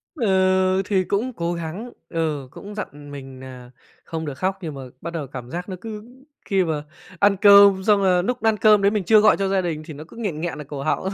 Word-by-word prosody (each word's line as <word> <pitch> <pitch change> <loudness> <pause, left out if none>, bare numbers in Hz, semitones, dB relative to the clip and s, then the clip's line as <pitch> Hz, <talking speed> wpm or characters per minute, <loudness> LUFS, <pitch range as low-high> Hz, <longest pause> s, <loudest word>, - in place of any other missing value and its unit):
Ừ, 190 - +2
thì 190 -1 +1
cũng 220 +8 -1
cố 170 -5 -3
gắng. 170 +8 -6 0.2
Ừ, 155 -5 -2
cũng 205 +8 -10
dặn 145 -8 -8
mình 135 -2 -10
nà 125 -2 -11 0.3
không 160 -1 -5
được 145 - -5
khóc. 190 +3 -1
Nhưng 155 -4 -5
mà 135 - -8 0.2
bắt 170 - -5
đầu 160 -4 -4
cảm 125 -2 -9
giác 180 +4 -5
nó 185 - -5
cứ 215 0 -7 0.4
khi 195 -3 +1
mà 155 -3 -3 0.4
ăn 200 0 +4
cơm 200 -1 +7
xong, 205 -1 +3
là 180 -2 +3
núc 250 +6 -3
ăn 220 -1 +2
cơm 210 -1 +5
đấy 200 - +4
mình 210 -2 -1
chưa 215 +3 +6
gọi 215 - +5
cho 195 -1 -1
gia 195 0 +1
đình, 165 -4 -3
thì 160 - -8
nó 150 +2 -9
cứ - - -15
nghẹn 200 -10 -4
nghẹn 170 -1 -4
ở 150 - -7
cổ 140 0 -7
họng, 155 +5 -1
185 Hz, 240 wpm, -22 LUFS, 155-200 Hz, 0.4 s, cơm